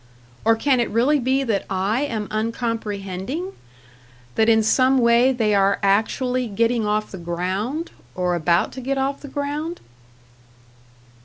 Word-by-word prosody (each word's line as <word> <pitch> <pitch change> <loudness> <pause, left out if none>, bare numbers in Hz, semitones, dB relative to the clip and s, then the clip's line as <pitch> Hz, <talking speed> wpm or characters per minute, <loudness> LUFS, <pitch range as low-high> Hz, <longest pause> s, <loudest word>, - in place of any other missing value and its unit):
Or 225 0 +5
can 255 +3 +2
it 235 - 0
really 255 +7 +2
be 265 +2 +1
that 220 -6 0
I 195 +6 0
am 225 -7 -2
uncomprehending? 220 - -3 0.8
That 220 - +3
in 220 -1 +4
some 260 +4 +3
way 235 +1 +4
they 225 -5 +1
are 200 0 +3
actually 245 +5 +1
getting 230 +1 0
off 215 +1 -1
the 190 - -7
ground, 190 - -3 0.2
or 180 -1 0
about 170 0 +1
to 260 - -8
get 270 +2 -2
off 270 +1 -1
the 290 - -8
ground? 295 +4 -4
230 Hz, 145 wpm, -22 LUFS, 200-265 Hz, 0.8 s, Or